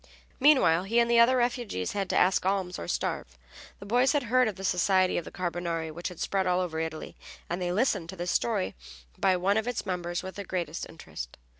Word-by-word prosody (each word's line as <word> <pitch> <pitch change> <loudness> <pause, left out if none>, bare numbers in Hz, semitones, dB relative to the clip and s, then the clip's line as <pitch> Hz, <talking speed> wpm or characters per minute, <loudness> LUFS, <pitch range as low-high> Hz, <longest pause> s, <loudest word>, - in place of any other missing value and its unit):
Meanwhile 255 - +5
he 225 +4 0
and 235 0 +3
the 235 - +5
other 250 +2 +6
refugees 240 - -1
had 200 -2 -2
to - - +1
ask 185 +1 +3
alms 190 -1 -1
or 85 - -6
starve. 65 -5 -3 0.4
The 200 - -11
boys 245 +7 +3
had 290 -2 +1
heard 250 +1 +3
of 215 - -3
the 195 - -9
society 185 0 +2
of 170 - -9
the - - -9
Carbonari 170 -2 -3
which 170 +3 -5
had 180 - -8
spread 190 -1 0
all 180 0 +2
over 170 -3 -2
Italy, 160 -1 -5 0.3
and 175 +2 -3
they 175 0 -1
listened 185 -5 0
to 190 - -6
this 175 0 -2
story 215 -5 0 0.5
by 185 -1 +3
one 195 +4 +2
of 220 +1 -1
its 245 - -2
members 175 -1 -3
with 190 +1 -7
the 200 - -4
greatest 175 -4 -4
interest. 80 - -9
185 Hz, 225 wpm, -28 LUFS, 175-220 Hz, 0.5 s, other